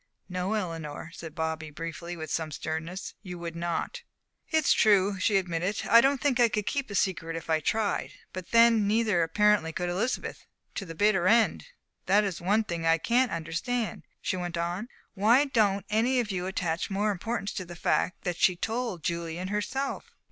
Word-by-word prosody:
"No, 185 +3 -2
Eleanor," 165 -5 -4
said 165 -3 -9
Bobby, 160 -1 -3
briefly 165 +2 -6
and 170 - -8
with 160 - -6
some 160 -1 -1
sternness, 160 +5 -5
"you 180 -4 -7
would 170 -1 -6
not." 170 - -3 0.5
"It's 315 -3 +4
true," 200 -2 +4
she 200 +1 +3
admitted, 180 +2 -2
"I 230 - +8
don't 275 +1 +2
think 265 -3 +1
I 240 -1 +6
could 210 -2 -2
keep 270 +3 -2
a 200 - -5
secret 170 -4 0
if 165 0 -5
I 160 - +3
tried. 215 +6 -1 0.2
But 185 -2 -7
then 230 -2 +5
neither 215 -4 +2
apparently 200 0 +3
could 180 +1 -2
Elizabeth 205 +8 -2 0.3
to 195 - -4
the 165 - -7
bitter 195 -2 +3
end. 230 - +3 0.4
That 200 +3 +5
is 190 -5 -3
one 205 +5 +2
thing 170 -5 -4
I 165 0 +4
can't 245 +8 +2
understand," 175 +9 -2 0.2
she - - 0
went 175 -1 -4
on, 175 +6 -2 0.3
"why 225 +6 +5
you 290 - -1
don't 200 -5 +2
any 235 +4 +2
of 225 -4 -1
you 180 -1 -2
attach 175 -3 -2
more 205 +2 +1
importance 205 +2 -3
to 185 - -4
the 175 0 -9
fact 175 +1 0
that 175 -1 -2
she 180 - +4
told 225 -3 -3
Julian 170 +1 -3
herself." 255 +7 -3
190 Hz, 190 wpm, -28 LUFS, 170-220 Hz, 0.5 s, I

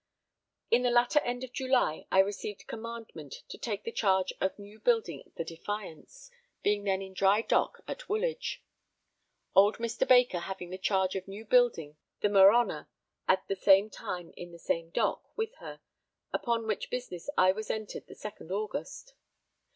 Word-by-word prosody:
In 235 - +5
the 250 - +2
latter 240 +4 +4
end 245 -2 -3
of 255 -1 -8
July 255 -12 +1
I - - +3
received 200 +1 -4
commandment 225 - -8
to - - -8
take 210 -4 -3
the 230 - -4
charge 190 -4 +1
of 190 - 0
new 205 +1 -13
building 215 - 0
the - - -2
Defiance, 205 - -7 0.3
being 205 0 +1
then 195 -1 0
in 190 0 -10
dry 195 +3 +3
dock - - +1
at - - -7
Woolwich. 475 +4 -2 0.9
Old 200 +2 +6
Mr. 230 0 -1
Baker 245 -8 +5
having 180 0 -6
the 185 - -6
charge 190 -1 +1
of 190 0 -4
new 200 +3 -8
building 210 -11 +2 0.2
the 205 - +3
Merhonor 200 +4 +5 0.4
at 190 0 +2
the 195 - -1
same 195 +2 +5
time 175 -3 -6
in 175 0 -9
the 170 - -11
same 165 0 -2
dock - - -2
with 445 +1 -2
her, - - -10 0.5
upon 230 -2 0
which 215 -2 -2
business 245 -6 -5
I 185 0 +6
was 215 +3 -6
entered 215 -1 -4
the - - -11
second 210 -5 -9
August. 215 - -4
205 Hz, 165 wpm, -30 LUFS, 190-240 Hz, 0.9 s, Old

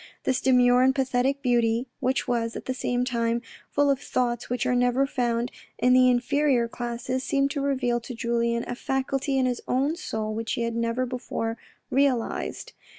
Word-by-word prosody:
This 260 -1 0
demure 250 -1 +5
and 265 +1 +4
pathetic 265 +1 0
beauty, 235 -1 +2
which 260 -1 0
was, 230 -1 -1
at - - -6
the 260 - -1
same 245 -1 -1
time, 235 -1 0 0.3
full 285 0 +3
of 275 - 0
thoughts 240 -3 -1
which 245 +1 -1
are 250 - +2
never 245 +2 +3
found 240 -3 -1 0.3
in 250 0 +3
the 255 0 +6
inferior 250 0 +2
classes, 240 +2 -3
seemed 275 +1 +1
to 285 - -2
reveal 255 -4 0
to 240 +1 -8
Julien 235 0 0
a - - -3
faculty 270 +2 -1
in 260 - +2
his 250 -1 -1
own 275 +5 +1
soul 220 -11 -4
which 225 +1 -3
he 235 - -1
had 230 0 -2
never 230 +2 0
before 240 -2 -3 0.4
realised. 275 - 0
250 Hz, 180 wpm, -26 LUFS, 235-265 Hz, 0.4 s, the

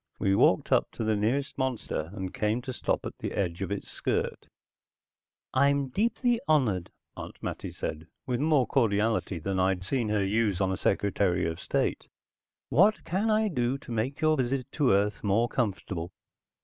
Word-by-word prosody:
We 95 - +1
walked - - +3
up - - +3
to - - -4
the 110 0 +1
nearest 125 +8 -1
monster 125 -11 -2
and 95 -2 -5
came 110 +3 0
to 130 -1 -5
stop - - -1
at - - -7
the - - -4
edge 90 -2 -2
of 95 - -3
its 100 - -4
skirt. - - -2 1.1
"I'm 140 0 +3
deeply 230 - +1
honored," 120 - +2 0.3
Aunt - - -8
Mattie - - -4
said 80 +1 -5 0.2
with 125 -2 -1
more 150 -3 +3
cordiality 110 -5 +1
than 95 +4 -2
I'd 95 0 +1
seen 115 +2 -1
her 105 -2 +1
use 105 -2 +1
on 95 -1 +1
a - - 0
Secretary 95 -3 +1
of 80 0 -3
State. - - -1 0.6
"What 200 - +4
can 195 +6 0
I 215 0 +3
do 125 -7 0
to 135 - -11
make 120 +7 -2
your 155 0 +3
visit 130 0 0
to 145 -4 +2
Earth 100 +2 +1
more 110 +3 +2
comfortable?" 95 -7 -2
115 Hz, 175 wpm, -28 LUFS, 95-135 Hz, 1.1 s, What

